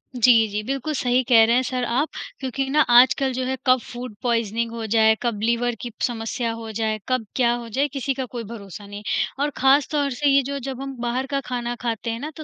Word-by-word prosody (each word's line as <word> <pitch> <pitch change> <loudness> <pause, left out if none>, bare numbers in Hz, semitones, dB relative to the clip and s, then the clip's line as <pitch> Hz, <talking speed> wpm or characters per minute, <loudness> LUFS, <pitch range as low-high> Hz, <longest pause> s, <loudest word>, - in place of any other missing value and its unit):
जी, 230 -2 +5
जी 210 +1 -3
बिल्कुल 275 +5 -3
सही 250 0 +2
कह 225 -2 +7
रहे 235 +2 +3
हैं 255 - +4
सर 250 0 -2
आप। 265 +7 0 0.3
क्योंकि 270 0 -3
ना 300 +2 +4
आजकल 260 +2 +5
जो 255 +1 -2
है 265 +1 -1
कब 255 0 +5
फूड 245 -3 -8
पॉइज़निंग 230 -1 0
हो 230 -1 -5
जाए, 220 0 +4
कब 230 -4 -1
लिवर 235 +1 +1
की 240 - -5 0.2
समस्या 230 0 -3
हो 225 -1 -7
जाए, 220 0 -1
कब 255 -3 0
क्या 240 -2 +3
हो 240 -1 -5
जाए 275 +6 +1
किसी 275 0 -1
का 260 0 -4
कोई 240 -1 -6
भरोसा 200 -2 -9
नहीं 205 0 -8
है। - - +1 0.2
और 295 - +1
ख़ास 270 +2 +4
तौर 290 -2 +1
से 285 +3 +1
ये 275 0 +5
जो 280 +1 -4
जब 265 0 -5
हम 275 -1 -6
बाहर 245 +2 -1
का 275 - +2
खाना 240 -1 -3
खाते 230 -1 -2
हैं 230 - -4
ना 300 +3 -5
तो 310 - -7
245 Hz, 240 wpm, -23 LUFS, 230-265 Hz, 0.3 s, कह